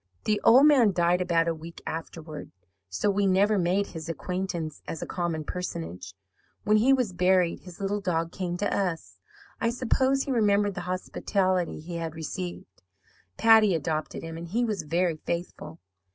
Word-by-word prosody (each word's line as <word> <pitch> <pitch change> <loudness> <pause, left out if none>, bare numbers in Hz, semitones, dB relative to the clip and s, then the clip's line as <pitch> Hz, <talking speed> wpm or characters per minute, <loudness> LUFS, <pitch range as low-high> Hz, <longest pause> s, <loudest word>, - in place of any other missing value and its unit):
"The 210 -1 0
old 260 +5 +7
man 255 -9 +5
died 175 +1 +2
about 170 -2 +2
a 165 - +1
week 165 +1 -10
afterward, 160 -1 -6 0.4
so 95 - 0
we 200 0 +1
never 200 +2 +3
made 185 +3 +1
his 160 -3 -8
acquaintance 175 -3 -4
as 165 - -4
a - - -4
common 170 -3 -2
personage. 90 - -6 0.5
When 215 +1 +4
he 240 +5 +4
was 250 -8 +2
buried, 180 -1 +2
his 180 -2 -13
little 200 +1 -1
dog 165 -3 -1
came 180 -2 -3
to 205 +3 -1
us. 180 -5 -3 0.4
I 230 - +1
suppose 260 +3 +1
he 275 - -4
remembered 205 -4 +2
the 180 - -5
hospitality 185 0 -1
he 170 +2 -6
had 165 -1 -4
received. 165 - -6 0.6
Patty 220 -4 +6
adopted 155 0 -3
him, 165 0 -6
and 170 - -7
he 235 +8 0
was 210 -6 -2
very 165 +1 0
faithful. 170 -1 -5
180 Hz, 165 wpm, -27 LUFS, 165-205 Hz, 0.6 s, old